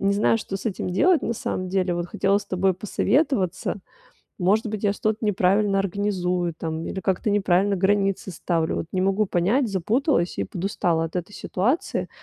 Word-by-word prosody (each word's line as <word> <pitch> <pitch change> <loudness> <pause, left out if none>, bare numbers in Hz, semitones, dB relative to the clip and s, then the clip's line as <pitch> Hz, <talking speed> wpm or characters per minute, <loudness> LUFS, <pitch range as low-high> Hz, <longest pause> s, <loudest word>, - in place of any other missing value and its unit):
не 195 0 +2
знаю, 210 +2 +3
что 195 -3 -5
с 195 - -7
этим 190 -3 -2
делать 330 - +3
на 230 - -1
самом 185 -3 -3
деле. 185 -1 0
Вот 175 0 -2
хотела 200 +2 +1
с 205 - -9
тобой 190 0 +1
посоветоваться. 205 - 0 0.6
Может 205 +5 +2
быть, 215 0 -4
я 200 - +3
что-то 215 +2 -2
неправильно 200 0 +2
организую 180 -3 -1
там 160 0 -4
или 190 - -4
как-то 190 +3 0
неправильно 200 0 +2
границы 195 0 +1
ставлю. 165 -1 -1
Вот - - -3
не 185 - 0
могу 195 +2 +2
понять, 205 +10 +1
запуталась 210 - 0
и 100 - 0
подустала 170 - -1
от 165 +2 -5
этой 180 +3 -4
ситуации. 245 - -1
195 Hz, 175 wpm, -24 LUFS, 180-210 Hz, 0.6 s, знаю